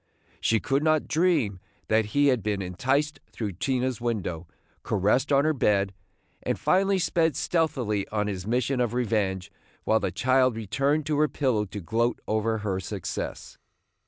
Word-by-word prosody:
She 110 - +2
could 135 +5 0
not 155 -1 +2
dream 155 - +1 0.3
that 110 0 +3
he 145 +7 +3
had 125 -4 +2
been 100 -1 -1
enticed 135 +11 0
through 105 -3 -4
Tina's 125 +5 -1
window, 95 -8 -3 0.3
caressed 105 +8 +1
on 140 +1 +4
her 155 - +3
bed, 100 -7 +1 0.5
and - - -1
finally 195 +1 +3
sped 165 -3 +1
stealthily 125 - 0
on 105 -1 -1
his 95 -2 -4
mission 125 +2 +1
of 120 -1 0
revenge, 100 -5 -1 0.3
while 110 - +3
the - - -1
child 130 +6 +2
returned 135 +8 0
to 150 -1 0
her 155 - +4
pillow 125 -8 0
to 100 +1 -7
gloat 115 +7 0
over 110 +1 0
her 95 -2 0
success. 95 0 -5
115 Hz, 160 wpm, -26 LUFS, 105-140 Hz, 0.5 s, on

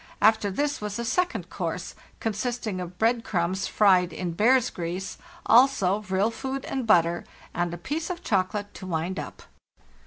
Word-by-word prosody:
After 215 -1 +4
this 285 +8 -1
was 210 -1 -3
a 235 - -3
second 360 +9 -1
course, - - -4 0.3
consisting 220 -2 -2
of 180 0 -7
bread 230 +3 +2
crumbs 185 +1 -1
fried 185 -4 +4
in 175 +2 -3
bear's 235 +8 +3
grease, 180 +2 -5 0.3
also 225 -6 +5
vril 200 +1 0
food 265 +3 -4
and 260 -4 -3
butter, 175 -4 +4 0.3
and 175 0 -1
a 175 - -5
piece 305 - -3
of 355 0 -5
chocolate 205 0 -1
to 185 - -9
wind 170 +2 -2
up." - - -8
205 Hz, 160 wpm, -26 LUFS, 180-240 Hz, 0.3 s, also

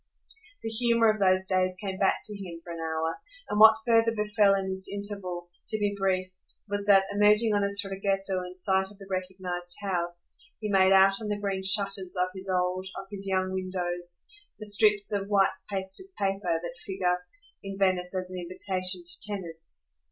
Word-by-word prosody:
The 225 - -3
humour 230 0 +3
of 215 - -5
those 185 -1 +3
days 185 -1 0
came 190 -2 -5
back 195 - +2
to 210 - -3
him 180 -4 -8
for 170 - -8
an 165 - -7
hour, 160 0 -2 0.3
and 210 - -2
what 220 0 +9
further 230 -1 +3
befell 210 -1 +3
in 195 -1 -2
this 190 0 -1
interval, 200 -4 -4 0.2
to 215 - +1
be 205 -1 0
brief, 185 -1 -1 0.4
was 205 0 -2
that, 195 -1 +6
emerging 210 +2 +3
on 205 -1 +1
a - - +2
traghetto 195 -1 -1
in 180 0 -9
sight 190 +1 +1
of 205 - -17
the 195 - -12
recognised 185 -1 -4
house, 175 -3 -3 0.3
he 215 - -4
made 190 -1 +4
out 195 +1 +5
on 215 - -4
the 210 0 -2
green 195 -2 -2
shutters 195 -1 +1
of 180 0 +1
his 190 0 -4
old, 185 0 0
of 195 - -10
his 195 -1 -2
young 185 -1 0
windows 175 -2 -2 0.3
the 215 - -7
strips 205 -1 +3
of 200 -1 -2
white 200 -2 +3 0.2
pasted 195 - -2
paper 195 -4 -1
that 170 0 -6
figure 180 -2 -1 0.4
in 195 0 -7
Venice 185 -1 +1
as 185 0 -3
an 185 - -5
invitation 185 0 +2
to 175 - +1
tenants. 165 - +1
190 Hz, 190 wpm, -27 LUFS, 185-205 Hz, 0.4 s, what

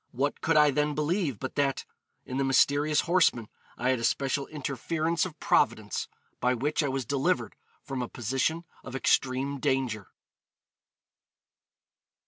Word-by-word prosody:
What 140 +4 -1
could 165 -1 +2
I 150 -1 +6
then 150 +1 0
believe 155 - 0
but 130 +3 -5
that... 140 -2 +1 0.4
in 130 - -4
the 135 - +1
mysterious 145 +3 +3
horseman 165 - +2 0.3
I 125 - 0
had 130 -2 +2
a - - -5
special 135 +3 0
interference 155 +4 -1
of 165 - -14
Providence, - - +1 0.3
by 125 +1 +2
which 145 +7 0
I 145 - 0
was 135 -1 -2
delivered 140 +8 0 0.3
from 135 -3 -4
a 125 - -4
position 135 +8 -1 0.2
of 130 - -8
extreme 135 +1 +1
danger?' 130 -7 -1
140 Hz, 140 wpm, -28 LUFS, 130-150 Hz, 0.4 s, I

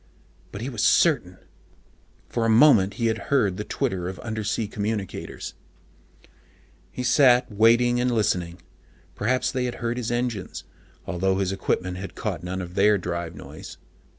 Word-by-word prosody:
But 100 - -7
he 125 - -3
was 115 -6 -4
certain: 120 - +3 0.9
for 115 - -2
a 115 - +2
moment 110 -5 +5
he 115 - -2
had 115 0 -2
heard 105 -10 +2
the 105 - -3
twitter 90 -3 -2
of 95 - -7
undersea 110 -1 -2
communicators. 105 -1 -4 1.4
He 125 - -5
sat 125 -2 +4
waiting 120 +3 +4
and 125 +1 +1
listening. 90 -7 -1 0.5
Perhaps 125 +5 0
they 130 -2 -1
had 125 - -3
heard 120 0 -3
his 120 -2 -3
engines, 120 -5 -3 0.4
although 95 +1 0
his 95 -1 0
own - - -5
equipment 90 -1 -1
had 95 +1 -7
caught 95 -8 -3
none 95 +1 -4
of 90 0 -9
their 105 +2 +4
drive 85 -2 -4
noise. - - -10
105 Hz, 155 wpm, -24 LUFS, 95-120 Hz, 1.4 s, moment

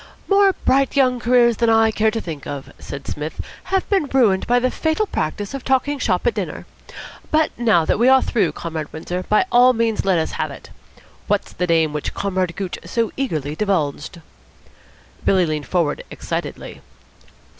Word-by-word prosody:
"More 395 -1 +4
bright 275 +1 +2
young 255 -3 +3
careers 240 -1 +3
than 235 -1 +2
I 225 0 +4
care 220 0 +2
to 225 +1 -3
think 160 -8 -7
of," 140 -2 -7
said 140 0 -8
Psmith, 150 +2 -5 0.3
"have 380 0 0
been 390 -6 +1
ruined 230 -9 +2
by 245 - +3
the 250 +1 +1
fatal 320 +7 0
practice 200 - -3
of 275 -2 -5
talking 275 +2 +1
shop 180 -5 0
at 240 - +2
dinner. 190 -8 -5 0.6
But 310 0 +2
now 220 -9 +3
that - - +1
we 240 - +4
are 265 0 +6
through, 190 - 0
Comrade 160 -2 -5
Windsor, 175 +3 -4
by 215 +12 +4
all 250 +1 +6
means 225 -2 0
let 190 -2 +2
us 160 - -1
have - - -2
it. - - -12 0.6
What's - - -1
the 180 - -2
name 160 -3 +2
which 150 - -4
Comrade 185 -3 -1
Gooch 190 -3 -4
so 230 -2 -1
eagerly 155 - -2
divulged?" 165 -5 -2 1.0
Billy 185 -2 +3
leaned 155 -2 -3
forward 170 -5 0
excitedly. - - -6
215 Hz, 175 wpm, -20 LUFS, 165-255 Hz, 1.0 s, are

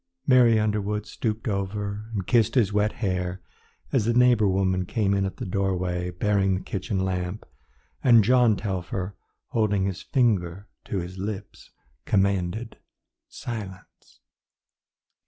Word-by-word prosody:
Mary 120 -4 +5
Underwood 105 0 -1
stooped 110 +2 -3
over 100 +1 -3
and 100 -4 -3
kissed 115 +1 +2
his 110 -6 +3
wet 105 +1 +2
hair 90 -1 -1 0.5
as 120 -6 +2
the 120 +1 +1
neighbour 120 -4 +5
woman 95 -1 +1
came 100 +2 0
in 100 -1 +1
at 95 - -7
the 125 - -5
doorway 90 -2 -1
bearing 95 +1 +1
the 95 - -4
kitchen 95 0 -2
lamp, 90 +2 -3 0.6
and 115 -4 +7
John 120 -1 +4
Telfer, 95 -1 -4 0.3
holding 105 -4 +1
his 95 -1 -3
finger 100 - 0 0.2
to 100 - -3
his 90 +1 -5
lips, 100 0 -6 0.4
commanded 100 +2 0 0.5
silence. 100 -6 -9
100 Hz, 130 wpm, -25 LUFS, 95-110 Hz, 0.6 s, and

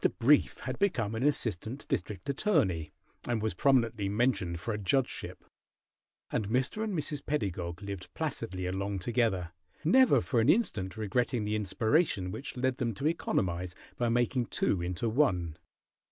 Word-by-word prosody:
Brief 140 +5 +4
had 130 0 -4
become 125 - +1
an 115 - -3
assistant 125 -3 -1
district 95 +1 -3
attorney, 100 - +1 0.4
and 120 -2 0
was 110 0 -1
prominently 115 -7 +2
mentioned 100 -6 0
for 110 +6 -3
a 105 - -3
judgeship, 125 +7 -1 0.9
and 105 - -1
Mr. 130 - 0
and 210 -5 -2
Mrs. 150 -1 -2
Pedagog 95 - -3
lived 100 -2 -6
placidly 115 - -3
along 100 +2 -2
together, 95 -4 0 0.3
never 255 +11 +6
for 125 -3 0
an 115 +5 +3
instant 110 - +1
regretting 115 +1 0
the 105 +1 0
inspiration 105 - +1
which 125 +5 -6
led 130 0 0
them 115 -4 -1
to 135 - -5
economize 90 - -1 0.2
by 120 -1 0
making 120 +1 +1
two 90 - 0
into 90 +6 -1
one. 95 - +1
115 Hz, 150 wpm, -30 LUFS, 95-130 Hz, 0.9 s, never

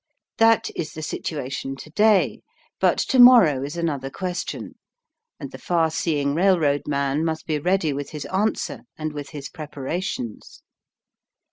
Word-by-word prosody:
That 225 0 +4
is 155 -2 -4
the 155 - -7
situation 135 -3 -4
to 155 +3 -12
day, 210 +2 +3 0.4
but - - +3
to 260 - +3
morrow 230 - +8
is 145 +4 -5
another 145 -6 -2
question, 180 +4 -5 0.7
and - - -7
the - - -10
far 165 -2 +1
seeing 145 -4 0
railroad 160 -5 +2
man 140 +1 0
must 160 -1 -2
be 155 -2 -1
ready 175 -1 +1
with 140 0 -5
his 150 -2 -6
answer 200 +7 -1 0.2
and 155 -1 -4
with 145 -2 -6
his 145 -2 -7
preparations. 145 - -6
155 Hz, 145 wpm, -23 LUFS, 140-180 Hz, 0.7 s, morrow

